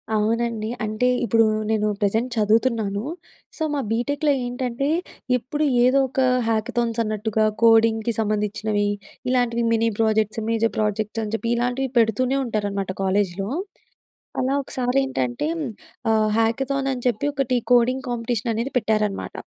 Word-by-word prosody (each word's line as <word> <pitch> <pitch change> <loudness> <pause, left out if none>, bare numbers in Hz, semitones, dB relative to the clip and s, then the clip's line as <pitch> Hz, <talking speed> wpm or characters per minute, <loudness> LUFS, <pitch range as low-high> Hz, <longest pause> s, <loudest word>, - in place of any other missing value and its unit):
అవునండి. 225 0 0 0.2
అంటే, 215 +4 0 0.2
ఇప్పుడు 225 +1 +4 0.3
నేను 215 -1 +1
ప్రెజెంట్ 220 +5 +1
చదువుతున్నాను. 215 -1 +1 0.5
సో, 320 - -2
మా 280 - 0
బీటెక్‌లో 285 +6 +1
ఏంటంటే, 250 +2 -2 0.5
ఎప్పుడు 295 +6 -2 0.2
ఏదో 270 +2 +4
ఒక 265 - -3 0.3
హ్యాకథాన్స్ 230 +1 0
అన్నట్టుగా 215 0 0 0.2
కోడింగ్‌కి 225 0 +4
సంబంధించినవి, 210 0 0 0.4
ఇలాంటివి 245 -2 +1
మినీ 230 0 +2
ప్రాజెక్ట్స్, 220 0 +1
మేజర్ 225 0 +1
ప్రాజెక్ట్స్ 215 +1 -1
అని 215 0 -5
చెప్పి, 230 +1 -3
ఇలాంటివి 245 +3 -1
పెడుతూనే 250 +4 +2
ఉంటారన్నమాట, 205 -4 -2
కాలేజ్‌లో. 195 0 0 0.9
అలా 260 +1 +1
ఒకసారేంటంటేం 260 - -1 0.5
ఆహ్, 215 -1 +3
హ్యాకథాన్ 270 +4 0
అని 250 -2 -6
చెప్పి 240 +2 0
ఒకటి 265 -3 0 0.2
కోడింగ్ 250 +2 +3
కాంపిటీషననేది 235 +1 -2
పెట్టారన్నమాట... 215 -3 -1
225 Hz, 115 wpm, -23 LUFS, 215-250 Hz, 0.9 s, ఇప్పుడు